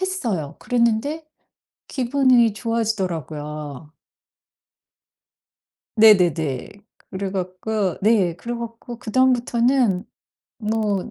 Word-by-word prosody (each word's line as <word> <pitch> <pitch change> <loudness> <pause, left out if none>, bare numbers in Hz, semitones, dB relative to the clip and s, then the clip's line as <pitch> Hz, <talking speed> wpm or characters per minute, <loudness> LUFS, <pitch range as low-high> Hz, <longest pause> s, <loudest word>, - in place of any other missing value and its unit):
했어요. 230 - -2
그랬는데 245 +7 0 0.6
기분이 255 -3 +3
좋아지더라고요. 160 - -3 2.0
네네네. 175 - +4 0.4
그래 190 0 -4
갖고 190 +1 -2
네 200 -6 +3
그래 235 +7 -6
갖고 235 0 -7
그다음부터는 245 -3 +2 0.5
뭐 215 -1 -1
220 Hz, 195 characters per minute, -22 LUFS, 180-240 Hz, 2.0 s, 네네네